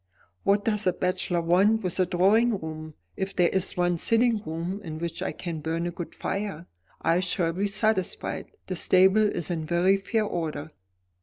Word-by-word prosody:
"What 200 0 +2
does 210 -2 +1
a 180 - +3
bachelor 180 -1 -1
want 195 +7 +3
with 180 0 -1
a 185 - +3
drawing 205 +6 +3
room? 155 -1 -7 0.2
If 190 +1 -4
there 175 -2 +4
is 190 -1 -1
one 175 -1 +1
sitting 230 +1 +2
room 170 +4 -4
in 160 -3 -6
which 170 +1 -4
I 190 - -1
can 170 -3 -5
burn 165 +2 -2
a 175 - -2
good 175 0 -7
fire, 195 -4 -4 0.4
I 170 +2 +3
shall 180 -2 0
be 195 +4 0
satisfied. 200 -2 -1 0.2
The 185 - -4
stable 190 +5 +4
is 175 -4 -3
in 165 -2 -2
very 175 +4 +3
fair 215 +2 -1
order." 160 -5 -4
180 Hz, 180 wpm, -26 LUFS, 170-200 Hz, 0.4 s, there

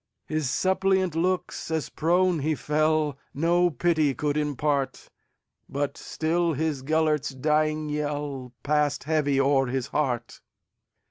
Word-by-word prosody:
His 155 -4 -1
suppliant 190 +1 +1
looks, 180 +1 -1
as 160 -5 -1
prone 175 +2 +2
he 155 +2 0
fell, 150 -1 +1 0.2
No 175 +4 +3
pity 155 -2 +1
could 145 -1 -1
impart; 145 -2 -1 0.6
But 140 0 -2
still 165 +1 -1
his 150 -1 -1
Gêlert's 155 0 +1
dying 155 +3 0
yellPassed 145 -1 -2
heavy 145 -3 +1
o'er 135 -1 +3
his 130 0 -2
heart. 125 -6 -2
150 Hz, 115 wpm, -26 LUFS, 140-160 Hz, 0.6 s, No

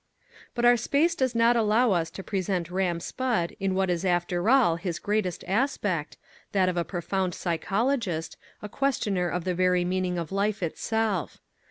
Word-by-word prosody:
But 240 -1 +1
our 240 0 +6
space 290 +8 +2
does 260 -6 -1
not 230 +1 +4
allow 225 +1 +3
us 165 -3 +1
to 190 +4 -9
present 185 -4 -2
Ram 180 -2 0
Spudd 220 -3 -2
in 190 -1 0
what 190 -1 +1
is 175 0 -1
after 175 +1 0
all 245 -11 +4
his 170 -1 -3
greatest 205 -4 -1
aspect, 195 - -1 0.4
that 190 -2 +3
of 180 - 0
a 175 - +1
profound 185 +1 -2
psychologist, 195 - -1 0.3
a - - -4
questioner 205 -8 0
of 180 0 -2
the 185 - -1
very 180 0 +2
meaning 180 0 -1
of 170 0 -4
life 200 0 0
itself. 210 +2 -1
190 Hz, 170 wpm, -27 LUFS, 175-225 Hz, 0.4 s, our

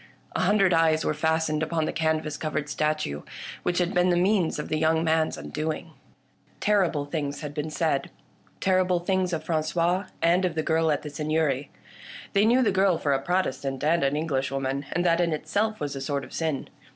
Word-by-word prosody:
A - - 0
hundred 195 -3 +3
eyes 160 -1 +3
were - - +1
fastened 160 0 0
upon 160 0 0
the - - -2
canvas 160 -2 0
covered 150 -1 -3
statue, 150 - -1 0.4
which 175 - -1
had 180 +1 +1
been 180 0 +3
the 175 - +3
means 185 -2 +2
of 150 - -4
the 155 - -1
young 160 +1 +2
man's 160 -1 +1
undoing. 155 +2 -4 0.7
Terrible 180 -8 +2
things 145 -1 -3
had 150 -2 -5
been 150 +1 -3
said 155 -2 0 0.3
— - - -34
terrible 185 -1 +2
things 185 +1 0
of 160 -2 -2
Frangois, 170 +4 0
and 175 +3 +3
of 180 -3 0
the 155 - 0
girl 160 0 +2
at 145 - -1
the 150 - -6
Seigneury. 150 -2 0 0.6
They 200 +1 +4
knew 250 +3 +4
the 210 - +3
girl 190 -2 +3
for 145 -3 0
a 135 - 0
Protestant 135 -6 -1
and 160 +1 +2
an 135 +1 +1
Englishwoman, 135 -2 -2
and 175 +1 0
that 170 0 +3
in 170 -2 +1
itself 215 +7 -1
was 145 -1 -3
a 135 - -5
sort 140 0 -2
of 130 - -11
sin. 160 -4 -2
160 Hz, 200 wpm, -26 LUFS, 150-175 Hz, 0.7 s, They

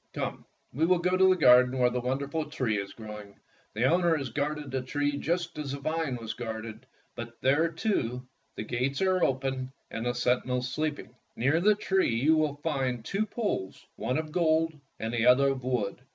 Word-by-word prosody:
Come, - - -4 0.3
we 155 +6 +1
will 180 0 +4
go 180 +2 +1
to 190 0 +5
the 185 - +5
garden 125 -5 +6
where 125 -1 +3
the 125 - -1
wonder 130 +3 -2
ful 155 +2 -2
tree 115 -8 -1
is 100 0 -5
growing. 105 -2 -10 0.4
The 110 - 0
owner 170 +2 +3
has 135 -4 -4
guarded 150 -1 -2
the 130 0 -1
tree 145 +3 -1
just 170 +2 -2
as 140 -2 -4
the - - -3
vine 155 -2 -1
was 115 -1 -5
guarded, 110 +1 -6 0.3
but 120 0 -8
there, 145 +5 +3
too, 130 - -2 0.3
the - - -4
gates 125 +5 -1
are 185 -2 +2
open 130 -1 -1 0.2
and 115 +2 -3
the 120 - +1
senti 125 +1 +1
nels 125 0 -1
sleeping. 145 -8 -3 0.2
Near 140 +7 +2
the 210 +3 +5
tree 190 - +1
you 145 +7 +4
will 155 -2 +1
find 130 -7 -1
two 210 +2 -1
poles, 205 - -3
one 125 - -1
of 155 -1 -3
gold 160 -1 +2 0.3
and 110 +1 -3
the 120 0 +2
other 135 +2 +6
of 135 -2 -3
wood. 125 -4 -2
135 Hz, 200 wpm, -28 LUFS, 125-160 Hz, 0.4 s, garden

